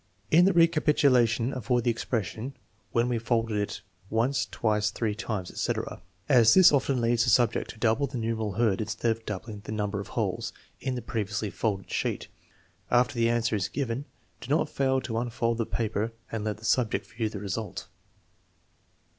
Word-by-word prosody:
In 170 Hz, +3 st, +7 dB
the 195 Hz, -, +4 dB
recapitulation 145 Hz, -8 st, +3 dB
avoid 125 Hz, 0 st, 0 dB
the 120 Hz, -, +3 dB
expression 115 Hz, +2 st, -3 dB, 0.2 s
" 110 Hz, 0 st, -39 dB
When 120 Hz, +1 st, +2 dB
we 120 Hz, -2 st, 0 dB
folded 115 Hz, -1 st, 0 dB
it 105 Hz, -, -3 dB, 0.3 s
once, 125 Hz, +4 st, +1 dB
twice, 105 Hz, -2 st, 0 dB
three 110 Hz, -3 st, -2 dB
times," 105 Hz, -4 st, -4 dB
etc., -, -, -3 dB, 0.3 s
as 115 Hz, -4 st, +6 dB
this 185 Hz, -1 st, +8 dB
often 135 Hz, -2 st, +2 dB
leads 120 Hz, 0 st, +2 dB
the 120 Hz, -, +1 dB
sub 120 Hz, -1 st, +4 dB
ject -, -, -3 dB
to -, -, -9 dB
double 115 Hz, +5 st, +2 dB
the 135 Hz, -, -5 dB
numeral 110 Hz, -2 st, -2 dB
heard 110 Hz, -1 st, +1 dB
instead 110 Hz, +2 st, 0 dB
of 115 Hz, 0 st, -4 dB
doubling 105 Hz, +1 st, -5 dB
the -, -, -7 dB
number 105 Hz, -1 st, -2 dB
of 100 Hz, -, -6 dB
holes -, -, -2 dB, 0.3 s
in 130 Hz, -1 st, -2 dB
the 125 Hz, -, -5 dB
previously 105 Hz, -1 st, -2 dB
folded 100 Hz, -4 st, -2 dB
sheet. -, -, -2 dB, 0.6 s
After 125 Hz, +1 st, +3 dB
the 115 Hz, -2 st, +2 dB
answer 115 Hz, -1 st, +1 dB
is 95 Hz, -3 st, 0 dB
given, 135 Hz, 0 st, -3 dB, 0.3 s
do -, -, -9 dB
not 150 Hz, -, +2 dB
fail 130 Hz, -1 st, +1 dB
to 115 Hz, -3 st, -2 dB
unfold 115 Hz, -1 st, -1 dB
the 115 Hz, -, 0 dB
paper 110 Hz, 0 st, -2 dB, 0.2 s
and 115 Hz, -2 st, -3 dB
let 105 Hz, -1 st, -2 dB
the 110 Hz, -, -11 dB
subject 120 Hz, -3 st, +1 dB
view 115 Hz, -2 st, -2 dB
the 105 Hz, -, -7 dB
result. 100 Hz, 0 st, -4 dB
115 Hz, 185 wpm, -28 LUFS, 110-125 Hz, 0.6 s, this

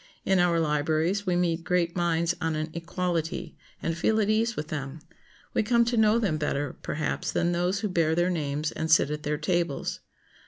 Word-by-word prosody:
In 190 Hz, -1 st, +3 dB
our 175 Hz, -1 st, +3 dB
libraries 160 Hz, +5 st, 0 dB
we 180 Hz, -, +2 dB
meet 170 Hz, -1 st, 0 dB
great 175 Hz, -1 st, 0 dB
minds 170 Hz, -1 st, +1 dB
on 160 Hz, -1 st, 0 dB
an 155 Hz, +1 st, -3 dB
equality, 170 Hz, -1 st, -3 dB, 0.3 s
and 165 Hz, -, -1 dB
feel 220 Hz, +6 st, +1 dB
at 210 Hz, 0 st, +2 dB
ease 225 Hz, +1 st, +1 dB
with 150 Hz, +1 st, -5 dB
them. 140 Hz, 0 st, -5 dB, 0.5 s
We -, -, +2 dB
come 235 Hz, +2 st, +3 dB
to 240 Hz, +1 st, 0 dB
know 220 Hz, 0 st, +4 dB
them 200 Hz, -9 st, 0 dB
better, 145 Hz, -2 st, -2 dB
perhaps, 155 Hz, +1 st, -2 dB
than 175 Hz, -, +1 dB
those 180 Hz, +3 st, 0 dB
who 215 Hz, -, 0 dB
bear 165 Hz, -4 st, +1 dB
their 175 Hz, +2 st, +2 dB
names 150 Hz, -2 st, -2 dB
and 160 Hz, -, -3 dB
sit 160 Hz, -2 st, +5 dB
at 150 Hz, 0 st, -3 dB
their 150 Hz, 0 st, -1 dB
tables. 170 Hz, -2 st, -1 dB
170 Hz, 195 wpm, -27 LUFS, 155-180 Hz, 0.5 s, sit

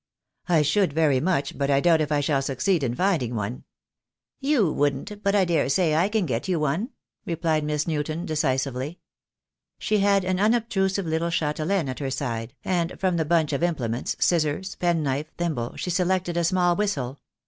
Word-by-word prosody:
"I 165 Hz, -3 st, +4 dB
should 165 Hz, +2 st, +2 dB
very 150 Hz, -4 st, +3 dB
much, 145 Hz, -3 st, 0 dB
but 140 Hz, 0 st, 0 dB
I 140 Hz, -1 st, +4 dB
doubt 165 Hz, +1 st, +4 dB
if 155 Hz, 0 st, -2 dB
I 145 Hz, -1 st, +2 dB
shall 140 Hz, -1 st, +1 dB
succeed 135 Hz, +6 st, 0 dB
in 120 Hz, -3 st, -1 dB
finding 160 Hz, -, 0 dB
one." 110 Hz, +3 st, -4 dB, 0.7 s
"You 270 Hz, -, +2 dB
wouldn't, 205 Hz, +9 st, -1 dB
but 200 Hz, 0 st, +1 dB
I 195 Hz, -2 st, +4 dB
daresay 165 Hz, -1 st, +2 dB
I 170 Hz, +6 st, +2 dB
can 215 Hz, -3 st, +1 dB
get 125 Hz, -1 st, -2 dB
you 180 Hz, -3 st, +1 dB
one," 155 Hz, -, -1 dB, 0.3 s
replied 165 Hz, -2 st, 0 dB
Miss 150 Hz, 0 st, -1 dB
Newton, 155 Hz, +2 st, -2 dB
decisively. 135 Hz, 0 st, -1 dB, 0.8 s
She 215 Hz, -1 st, 0 dB
had 200 Hz, -1 st, +3 dB
an 185 Hz, 0 st, 0 dB
unobtrusive 205 Hz, -3 st, +1 dB
little 160 Hz, +1 st, -1 dB
chatelaine 160 Hz, +2 st, 0 dB
at 130 Hz, -, -5 dB
her 140 Hz, -2 st, -2 dB
side, 125 Hz, -2 st, -4 dB
and 175 Hz, -2 st, -1 dB
from 185 Hz, -2 st, +1 dB
the 160 Hz, -, 0 dB
bunch 160 Hz, -2 st, +2 dB
of 140 Hz, -, -1 dB
implements, 130 Hz, -9 st, -1 dB
scissors, 170 Hz, +2 st, +1 dB
penknife, 155 Hz, -4 st, -1 dB
thimble, 155 Hz, -9 st, -2 dB
she 180 Hz, -, -3 dB
selected 180 Hz, -1 st, 0 dB
a 170 Hz, -, +1 dB
small 175 Hz, 0 st, +2 dB
whistle. 145 Hz, -11 st, -2 dB
160 Hz, 175 wpm, -25 LUFS, 140-185 Hz, 0.8 s, I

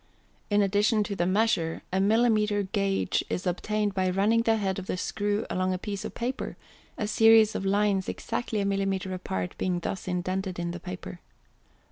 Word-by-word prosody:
In 205 Hz, -1 st, +3 dB
addition 210 Hz, +2 st, +2 dB
to 200 Hz, -, -4 dB
the 175 Hz, -2 st, 0 dB
measure 185 Hz, -5 st, +1 dB
a 190 Hz, -, +2 dB
millimètre 210 Hz, -1 st, +2 dB
gauge 195 Hz, -2 st, 0 dB
is 180 Hz, -, -2 dB
obtained 205 Hz, +3 st, -1 dB
by 185 Hz, -1 st, +1 dB
running 205 Hz, +5 st, +3 dB
the 225 Hz, -1 st, +3 dB
head 195 Hz, -3 st, -1 dB
of 190 Hz, -, -8 dB
the -, -, -2 dB
screw 205 Hz, +2 st, -1 dB
along 185 Hz, 0 st, 0 dB
a -, -, -2 dB
piece 200 Hz, 0 st, -5 dB
of -, -, -6 dB
paper, 250 Hz, +3 st, -3 dB, 0.4 s
a 215 Hz, -, -1 dB
series 225 Hz, 0 st, +5 dB
of 195 Hz, -, -2 dB
lines 200 Hz, -1 st, +1 dB
exactly 230 Hz, -2 st, -3 dB
a -, -, 0 dB
millimètre 195 Hz, -1 st, -1 dB
apart 95 Hz, -, -4 dB
being 180 Hz, -1 st, 0 dB
thus 185 Hz, +2 st, -4 dB
indented 185 Hz, +1 st, -2 dB
in 170 Hz, 0 st, -2 dB
the 175 Hz, -, -6 dB
paper. 180 Hz, 0 st, -7 dB
195 Hz, 180 wpm, -27 LUFS, 185-210 Hz, 0.4 s, series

